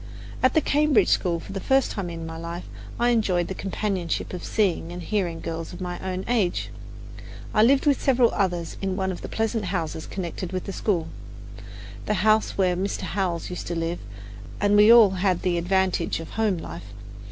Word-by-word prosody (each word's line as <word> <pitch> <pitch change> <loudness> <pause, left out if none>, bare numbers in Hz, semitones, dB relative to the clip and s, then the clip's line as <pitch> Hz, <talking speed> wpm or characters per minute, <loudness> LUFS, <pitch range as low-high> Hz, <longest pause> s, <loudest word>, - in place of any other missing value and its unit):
At 255 0 +3
the 315 - +5
Cambridge 290 -9 +3
school, 170 -2 +1
for 195 - -10
the 195 - -3
first 270 +5 +2
time 195 -4 -4
in 165 -1 -6
my 160 0 -6
life, 170 +2 -6 0.4
I 240 +1 +3
enjoyed 195 -7 +1
the - - -2
companionship 190 -3 -2
of 180 - -5
seeing 185 -5 0
and 175 - -6
hearing 175 -4 -1
girls 165 +1 -5
of 175 - -9
my 180 -1 -4
own 185 0 -4
age. 215 -8 0 0.8
I 215 - +4
lived 265 +6 +4
with 285 -2 +3
several 250 -3 +4
others 175 -5 -1
in 190 -1 -1
one 190 -1 -1
of 180 - -7
the - - -7
pleasant 225 -1 -1
houses 165 -4 -3
connected 185 -1 -5
with 185 - -2
the 195 - -6
school, 180 -7 0 1.0
the 210 - +1
house 215 0 +3
where 185 -2 +2
Mr. 195 +3 -2
Howells 180 -4 -2
used 180 - -6
to 170 - -2
live, 165 +1 -2 0.6
and 205 0 +3
we 210 +2 +7
all 230 -4 +8
had 185 -1 0
the 175 -2 +1
advantage 185 -1 +1
of 165 - -8
home 215 -4 +1
life. 85 - -8
190 Hz, 195 wpm, -25 LUFS, 175-210 Hz, 1.0 s, all